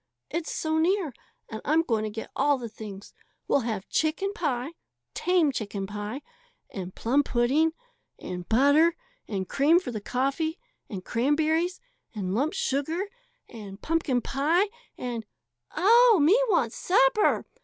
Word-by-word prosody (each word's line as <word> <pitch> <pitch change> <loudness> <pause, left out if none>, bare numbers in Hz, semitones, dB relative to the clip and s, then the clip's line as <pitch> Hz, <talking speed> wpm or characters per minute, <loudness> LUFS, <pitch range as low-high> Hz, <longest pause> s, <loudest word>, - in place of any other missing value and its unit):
"It's 330 +1 -3
so 315 0 -1
near; 345 -3 +1 0.3
and 220 -1 -7
I'm 315 +3 +3
going 225 -8 0
to - - -2
get 220 +1 -7
all 285 +1 +3
the 240 -2 -6
things. 210 -2 -10 0.3
We'll - - +3
have 220 -6 -3
chicken 335 +6 0
pie 280 - -2 0.4
tame 355 -5 +2
chicken 205 -5 -4
pie 210 +7 -6 0.5
and 185 -2 -6
plum 260 +5 +2
pudding 280 +6 +2 0.4
and 180 -1 -7
butter 285 +8 +4 0.3
and 190 -3 -3
cream 300 - +4
for 360 - -6
the 215 -3 -5
coffee 275 - -1 0.3
and 185 -3 -6
cranberries 315 +8 +1 0.4
and 190 -3 -2
lump 280 +9 0
sugar 315 +9 -1 0.4
and 205 -3 -10
pumpkin 300 -5 0
pie 325 - +1 0.3
and 240 -3 -4 0.3
" 120 0 -28
"Oh, 455 +5 +6
me 310 +8 +5
wants 250 - +1
supper!" 455 +2 +3
280 Hz, 145 wpm, -27 LUFS, 225-330 Hz, 0.5 s, Oh